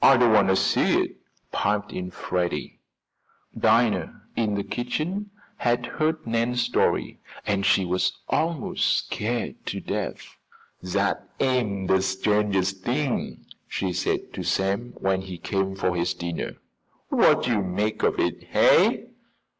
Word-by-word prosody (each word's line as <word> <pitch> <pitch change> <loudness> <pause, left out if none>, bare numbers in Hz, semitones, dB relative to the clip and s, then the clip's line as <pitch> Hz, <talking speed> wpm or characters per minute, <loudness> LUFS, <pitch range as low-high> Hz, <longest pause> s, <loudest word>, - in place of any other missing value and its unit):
"Don't 125 -4 +6
want 105 -2 +5
to 95 - +4
see - - +3
it," - - -2 0.3
piped 105 0 0
in 90 0 -4
Freddie. 85 -4 -3 0.8
Dinah, 115 0 +2
in 110 -3 0
the 100 - -1
kitchen, 155 - -3 0.3
had 120 0 +1
heard 155 +3 -1
Nan's 115 +1 +1
story - - 0 0.3
and 100 -1 0
she 95 -1 +3
was 90 +1 0
almost 165 -3 -1
scared 115 +3 -3
to - - -2
death. - - -5 0.5
"Dat 100 +2 -1
am 120 -8 +1
de 95 0 +3
strangest 95 -1 0
t'ing," 130 +2 -2 0.2
she 95 -2 -2
said - - -2
to - - -4
Sam, 100 +6 -1
when 95 0 0
he 95 -2 -7
came 95 +1 -1
for 90 -2 0
his 90 +1 0
dinner. 85 -1 -4 0.6
"Wot - - +4
yo' 115 -4 +2
make 100 +3 -1
of - - +2
it, - - -1
hey?" - - +4
100 Hz, 135 wpm, -25 LUFS, 95-120 Hz, 0.8 s, Don't